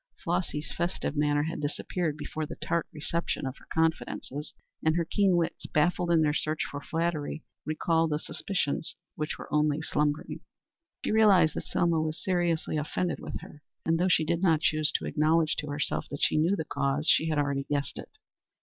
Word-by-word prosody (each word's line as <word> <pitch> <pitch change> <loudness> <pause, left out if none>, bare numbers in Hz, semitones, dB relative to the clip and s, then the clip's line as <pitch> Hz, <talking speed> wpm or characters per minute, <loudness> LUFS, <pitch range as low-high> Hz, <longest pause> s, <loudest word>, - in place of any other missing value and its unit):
Flossy's 150 -4 -2
festive 170 -3 -2
manner 145 0 +2
had 160 +2 -3
disappeared 155 +1 -2
before 155 0 -4
the - - -7
tart 170 -1 -1
reception 160 0 -2
of 130 0 -3
her - - -18
confidences, 160 -2 -1 0.3
and 160 0 +3
her 170 -1 +1
keen 190 +2 +3
wits, 170 -1 -1
baffled 175 +3 +2
in 165 -2 +5
their 150 -1 +2
search 155 0 0
for 145 - -5
flattery, 160 0 -2 0.2
recalled 165 +1 +2
the 150 - +1
suspicions 160 -2 -2 0.2
which 155 0 -3
were - - -8
only 150 0 +3
slumbering. 150 +1 -1 0.7
She - - +1
realized 200 -7 +6
that - - -4
Selma 170 -2 +2
was 155 +1 -2
seriously 175 -4 +1
offended 165 +4 -1
with - - -6
her, 150 - -12 0.2
and 165 0 +2
though 180 - +3
she 160 -3 +3
did 170 +2 0
not 165 -5 +4
choose 155 -2 +3
to - - 0
acknowledge 155 +1 +2
to 150 - -4
herself 145 +1 -2
that 145 - -4
she - - +3
knew 170 +6 +3
the 160 - -3
cause, 140 +2 -1
she 160 - +4
had 155 - 0
already 140 -1 0
guessed 145 -1 -1
it. - - -11
155 Hz, 185 wpm, -29 LUFS, 150-170 Hz, 0.7 s, realized